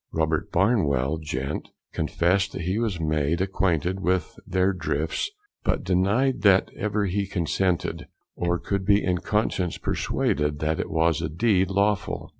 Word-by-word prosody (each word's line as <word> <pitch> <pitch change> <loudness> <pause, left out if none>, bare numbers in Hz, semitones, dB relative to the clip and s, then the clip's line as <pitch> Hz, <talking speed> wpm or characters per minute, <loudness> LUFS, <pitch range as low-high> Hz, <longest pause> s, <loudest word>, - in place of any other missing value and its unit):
Robert 80 -1 0
Barnwell, 80 - +2
Gent, 75 -2 -4 0.2
confessed 95 +3 +1
that - - -4
he 95 +5 0
was 110 -7 -1
made 80 +1 0
acquainted 95 -1 0
with 90 -2 0
their 95 +1 +2
Drifts, 80 - -2 0.3
but - - 0
denied 100 +9 +1
that 95 -2 +4
ever 105 0 -1
he 100 +1 -1
consented, 90 -1 -1 0.3
or 85 0 0
could 100 +3 -2
be 100 +1 +3
in 90 -1 +1
conscience 95 -2 -1
persuaded 75 0 -1
that 75 +1 -1
it - - -2
was 80 -1 +2
a 80 - -2
deed 95 +2 +2
lawful. 100 +1 0
90 Hz, 145 wpm, -25 LUFS, 80-100 Hz, 0.3 s, that